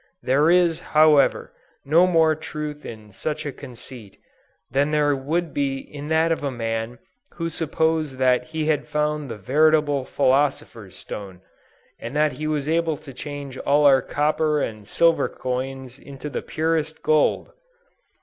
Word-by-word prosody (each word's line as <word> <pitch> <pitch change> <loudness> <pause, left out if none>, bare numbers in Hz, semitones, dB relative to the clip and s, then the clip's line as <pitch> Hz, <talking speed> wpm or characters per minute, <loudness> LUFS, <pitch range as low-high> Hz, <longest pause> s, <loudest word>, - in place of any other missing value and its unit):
There 145 +5 +3
is, 175 -2 +3
however, 155 -2 +3 0.3
no 165 +6 +5
more 165 -3 +4
truth 150 -1 -6
in 110 -2 -10
such 155 +9 -4
a 145 - -3
conceit, 120 -4 -11 0.5
than 140 +3 +2
there 150 -1 +2
would 160 +5 -2
be 140 -1 -1
in 145 +2 -9
that 160 +1 +2
of 160 - -1
a 140 - 0
man 115 -1 -3 0.4
who 165 -1 -3
supposed 160 -3 -1
that 125 -1 +2
he 160 +1 -3
had 155 -1 0
found 150 -1 -1
the 115 - -6
veritable 145 +4 +2
philosopher's 130 -7 0
stone; 95 -3 -8 0.6
and 120 +5 -7
that 150 0 +3
he 150 +4 -5
was 150 -2 -2
able 165 -1 +1
to 135 -2 -12
change 140 -1 -7
all 145 +1 +2
our 135 -2 +6
copper 150 +1 0
and 110 -6 -4
silver 165 +7 +2
coins 130 0 -5
into 140 +1 -9
the - - -3
purest 160 -1 -2
gold! 155 -1 +2
145 Hz, 150 wpm, -23 LUFS, 130-155 Hz, 0.6 s, our